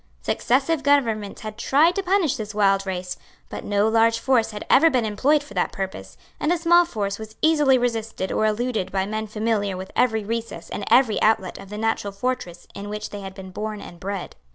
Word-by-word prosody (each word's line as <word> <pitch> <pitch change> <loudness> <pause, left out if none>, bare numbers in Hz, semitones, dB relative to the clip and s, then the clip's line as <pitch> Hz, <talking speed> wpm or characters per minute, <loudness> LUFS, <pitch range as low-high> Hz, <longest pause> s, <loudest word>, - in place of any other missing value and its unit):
Successive 275 - +1
governments 235 -8 +1
had 215 0 -7
tried 305 +8 +4
to 395 - -1
punish 370 -6 +1
this 215 -1 -6
wild 195 -1 +2
race; 180 -1 -4 0.3
but - - -6
no 205 +1 +1
large 225 +1 +3
force 245 -2 +2
had 210 -1 -7
ever 325 +5 +6
been 250 -6 +1
employed 275 +8 +2
for 210 - -13
that 180 - 0
purpose; 185 - -6 0.2
and 300 - +1
a 350 - +2
small 345 +1 +5
force 200 -9 -3
was 220 0 -9
easily 295 -4 +5
resisted 225 -5 -2
or 215 - +2
eluded 220 -2 -1
by 190 -1 0
men 215 +1 -3
familiar 210 -2 -1
with 190 +1 -8
every 220 -3 +2
recess 230 +2 -5
and 200 - -4
every 245 -4 +4
outlet 210 -4 +1
of 195 - -11
the 210 - -6
natural 220 -2 -1
fortress 195 -5 -4
in 205 +1 -7
which 210 0 -5
they 205 - -6
had 190 -1 -8
been 190 -1 -9
born 210 +2 -4
and 175 -3 -11
bred. 195 0 -5
215 Hz, 205 wpm, -23 LUFS, 200-255 Hz, 0.3 s, ever